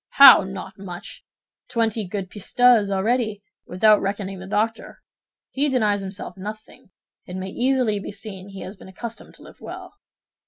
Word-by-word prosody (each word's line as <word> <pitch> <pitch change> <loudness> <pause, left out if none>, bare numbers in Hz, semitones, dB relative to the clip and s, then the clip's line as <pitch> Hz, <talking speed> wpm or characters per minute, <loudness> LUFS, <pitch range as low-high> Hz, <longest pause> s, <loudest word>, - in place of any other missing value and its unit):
"How, 275 -2 +10
not 190 0 -8
much! 180 -3 -9 0.5
Twenty 225 -3 0
good 190 -1 -5
pistoles, 220 +1 +3
already, 215 +1 0 0.2
without 210 +3 +4
reckoning 195 -1 -3
the 190 - -9
doctor. 220 +3 -2 0.5
He 285 +2 +1
denies 210 -6 +1
himself 190 -1 -7
nothing; 210 +1 -9 0.4
it 180 - -7
may 185 0 -4
easily 250 -4 +1
be 200 - -7
seen 200 -2 -9
he 195 -1 -9
has 190 - -7
been - - -13
accustomed 230 +5 -8
to - - -16
live - - -15
well." - - -9
205 Hz, 155 wpm, -23 LUFS, 190-225 Hz, 0.5 s, How